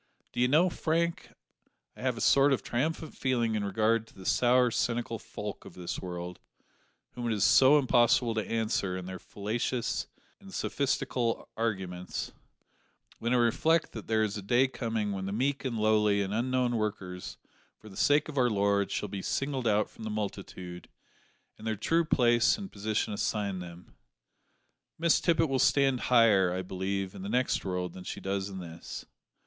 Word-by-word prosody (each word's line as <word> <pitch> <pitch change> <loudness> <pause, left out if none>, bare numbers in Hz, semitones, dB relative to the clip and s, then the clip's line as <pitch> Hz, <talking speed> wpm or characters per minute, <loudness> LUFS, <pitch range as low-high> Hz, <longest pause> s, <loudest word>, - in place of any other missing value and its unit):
D'ye 125 +1 +2
know, 155 +7 +4
Frank, 170 -1 -1 0.6
I - - -12
have 125 -2 0
a - - -5
sort 140 0 +5
of 130 - -1
triumphant 155 +6 -2
feeling 120 -4 0
in 105 -1 -1
regard 110 +3 +1
to - - -20
the 95 - -12
sour, 125 0 +4
cynical 115 -1 -1
folk 105 0 -7
of - - -12
this 90 -1 -5
world 90 -1 -6 0.7
whom 120 -1 -4
it 115 - +1
is 105 - 0
so 135 +6 +7
impossible 120 -3 +3
to 110 -1 -3
answer 110 -5 0
in 90 - -6
their 95 0 -6
fallacious 120 +4 -2 0.3
and 195 -1 -13
sophistical 130 -7 -1
arguments 95 -5 -3 0.9
when 115 +1 -1
I 125 - +4
reflect 155 +8 +2
that 110 - -8
there 110 -1 +2
is 105 -1 -2
a - - -5
day 120 +7 +3
coming 115 -5 -2
when 95 -1 -3
the - - -3
meek 135 +7 0
and 120 -3 -2
lowly 105 -2 +3
and 95 +1 -4
unknown 125 +1 +1
workers 95 -4 -4 0.4
for 110 - -15
the 100 - -12
sake 145 +6 +3
of 145 -3 -3
our 125 -1 +4
Lord 100 -1 +1
shall 105 - -2
be 95 0 -5
singled 135 0 -1
out 105 0 +2
from - - -13
the 110 - -4
multitude, 100 -4 -6 0.7
and 110 - -7
their 110 - 0
true 165 +11 +1
place 120 - +3
and 195 -2 -7
position 105 +1 -2
assigned 100 -2 -1
them. 85 0 -11 1.0
Miss 165 0 +3
Tippet 165 -2 +3
will 135 -2 0
stand 135 -2 +3
higher, 110 -7 +5
I 95 +1 -2
believe, 95 +1 -3
in 100 - -9
the 100 - -5
next 125 +3 +1
world 90 -2 -3
than 90 - -9
she - - -6
does 95 0 -2
in 95 - -7
this. 85 -2 -8
110 Hz, 175 wpm, -29 LUFS, 100-125 Hz, 1.0 s, so